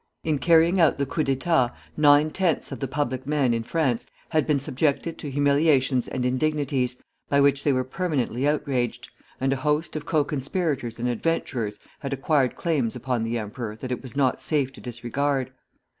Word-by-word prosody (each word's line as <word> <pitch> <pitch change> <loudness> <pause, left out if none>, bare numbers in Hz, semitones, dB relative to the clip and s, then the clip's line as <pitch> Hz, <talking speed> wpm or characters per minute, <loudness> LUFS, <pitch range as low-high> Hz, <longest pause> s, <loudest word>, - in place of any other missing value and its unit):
In 155 -3 0
carrying 170 +3 +4
out 160 - +4
the 140 - 0
coup 155 +3 -1
d'état 135 -2 +2 0.2
nine 150 0 +5
tenths 175 -3 0
of - - -5
the 135 - -2
public 130 -2 -2
men 145 -5 +2
in 115 - 0
France 125 -1 -1 0.2
had 155 -2 +1
been 150 -3 +2
subjected 140 +4 -1
to 145 - -5
humiliations 140 -2 +2
and 125 - -2
indignities, 130 -1 0 0.3
by 140 - +3
which 140 -1 +3
they 145 - +3
were 130 -1 +1
permanently 135 -3 -1
outraged, 125 -5 -1 0.3
and 135 +1 +1
a - - -2
host 150 +4 0
of 150 -1 -5
co 155 -2 +3
conspirators 140 -4 -2
and 120 +1 -2
adventurers 120 -5 -1 0.2
had 140 -2 -4
acquired 135 -1 +1
claims 145 -10 0
upon 125 -1 -2
the 115 +1 -1
emperor 110 0 -5
that 125 +3 -7
it 125 - -2
was 130 -2 -10
not 135 -3 +1
safe 140 -4 0
to - - -13
disregard. 130 +3 -2
135 Hz, 180 wpm, -25 LUFS, 125-150 Hz, 0.3 s, nine